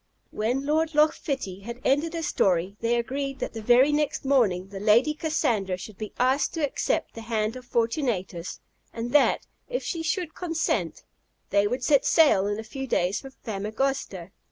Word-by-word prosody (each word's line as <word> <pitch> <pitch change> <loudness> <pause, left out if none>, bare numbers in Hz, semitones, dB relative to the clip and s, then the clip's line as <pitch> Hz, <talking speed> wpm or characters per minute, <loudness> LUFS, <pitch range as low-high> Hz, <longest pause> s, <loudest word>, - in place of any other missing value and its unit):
When 245 +6 -1
Lord 315 +1 +1
Loch 305 +1 +5
Fitty 200 -10 -4
had 235 +4 -8
ended 300 +5 +2
his 330 -1 -2
story, 185 - +1
they 230 +1 +1
agreed 270 +3 -2
that - - -4
the 225 - -6
very 245 +6 +5
next 295 -1 -1
morning 205 -9 +2
the 195 -1 -7
Lady 230 +8 +4
Cassandra 240 - 0
should 200 +1 -10
be 215 -1 -5
asked 260 +6 +1
to 320 -3 +1
accept 280 - -1
the 225 - -8
hand 225 0 -1
of 255 -1 -9
Fortunatus; 230 - -2 0.3
and 235 +1 -5
that, 295 - +3 0.2
if - - -2
she 335 - -3
should 325 0 -2
consent, 330 -3 -2 0.5
they 200 0 +3
would 250 +4 -3
set 285 0 +4
sail 280 - +4
in 205 0 -1
a - - -5
few 270 +4 -6
days 185 -3 0
for 270 - -9
Famagosta. 215 -4 -3
245 Hz, 180 wpm, -26 LUFS, 210-290 Hz, 0.5 s, Loch